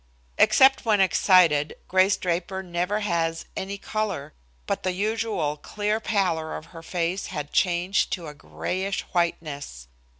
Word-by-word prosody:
Except 270 0 +6
when 215 -4 +2
excited, 180 -6 +4
Grace 190 +1 +3
Draper 185 +1 -2
never 180 +4 -1
has 165 -4 -1
any 195 +1 -4
color, 215 -1 -3 0.3
but - - -2
the 185 - -1
usual 210 -6 -1
clear 210 +6 -2
pallor 180 -8 -1
of - - -10
her 165 - -9
face 175 +3 -2
had 150 -4 -6
changed 180 +2 +1
to 175 -3 -4
a 150 - -7
grayish 145 - -3
whiteness. 145 - -2
180 Hz, 135 wpm, -25 LUFS, 165-200 Hz, 0.3 s, Except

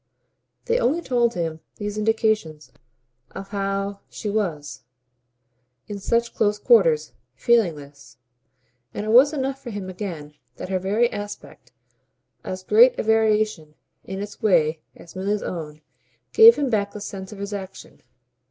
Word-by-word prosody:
They 475 +1 +1
only 305 - +1
told 240 -6 0
him, 165 -2 -3 0.2
these 205 0 -5
indications, 215 -8 -1 0.6
how 195 0 -3
much 200 0 -8
she 210 - -5
was, 165 -9 -3 1.0
in 205 -1 -7
such 235 +4 0
close 210 -1 +1
quarters, 165 - +3 0.2
feeling 200 - +2
his; 140 0 -14 0.8
and 205 - -4
it - - -3
was 260 +5 +7
enough 270 -2 -3
for 245 - -8
him 200 -4 -6
again 170 -6 -7 0.2
that - - -8
her 190 -1 0
very 205 +6 +1
aspect, 205 0 -8 0.7
as 185 0 -6
great 230 +6 +5
a - - -1
variation 215 -7 +1 0.3
in 190 +1 -6
its 205 0 -10
way 160 -6 +2
as 170 - -15
Milly's 200 +2 -2
own, 155 -3 -6 0.5
gave 455 +1 +9
him 280 -3 -1
back 200 -2 0
the 210 - -7
sense 195 -1 -7
of 210 - -9
his 200 +1 -6
action. 195 -1 -9
205 Hz, 145 wpm, -23 LUFS, 180-220 Hz, 1.0 s, gave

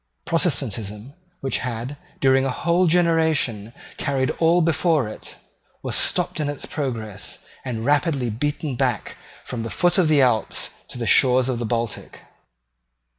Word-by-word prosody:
Protestantism, 120 - 0 0.3
which 135 -3 +1
had, 125 +2 -4 0.2
during 135 -1 +4
a 135 - 0
whole 170 +7 +1
generation, 160 - +2 0.3
carried 135 -2 0
all 170 +1 +4
before 160 -4 +2
it, 110 - -8 0.5
was - - -2
stopped - - +1
in 150 -1 -1
its 145 - -4
progress, 110 -8 -4 0.3
and 115 -3 -4
rapidly 145 -4 +1
beaten 145 +4 -2
back - - -1 0.3
from 120 -2 -5
the 115 - -4
foot 175 - +2
of 175 - +4
the 150 -3 +4
Alps 115 -4 0 0.2
to - - -8
the 120 - -3
shores 130 +1 +5
of 125 -2 -1
the 120 - -2
Baltic. 115 -1 -3
135 Hz, 145 wpm, -22 LUFS, 115-155 Hz, 0.5 s, shores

